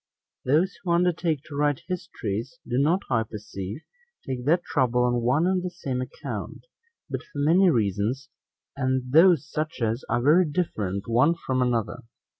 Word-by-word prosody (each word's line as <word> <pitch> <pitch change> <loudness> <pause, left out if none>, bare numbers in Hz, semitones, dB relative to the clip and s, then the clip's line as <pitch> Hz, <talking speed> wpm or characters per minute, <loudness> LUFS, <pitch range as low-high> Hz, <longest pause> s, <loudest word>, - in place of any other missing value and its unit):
Those 160 +9 +1
who 175 -3 0
undertake 170 -4 +1
to 150 - -10
write 145 -1 0
histories, 135 - -4
do 120 +1 0
not, 170 +8 +2
I 115 -2 +3
perceive, 105 +1 -7 0.4
take 125 -2 -4
that 170 +4 +3
trouble 125 -5 +1
on 120 -1 +1
one 130 +8 +2
and 185 0 +1
the 180 - -3
same 135 -8 -4
account, 130 - -6 0.4
but - - -4
for - - -13
many 170 +6 +4
reasons, 110 - 0 0.5
and 130 -2 -1
those 160 -1 +5
such 155 -1 -4
as 115 +1 -1
are 120 -1 +1
very 165 +6 +5
different 105 - -2
one 125 +9 +3
from 130 -6 -2
another. 120 -1 0
135 Hz, 160 wpm, -25 LUFS, 120-165 Hz, 0.5 s, those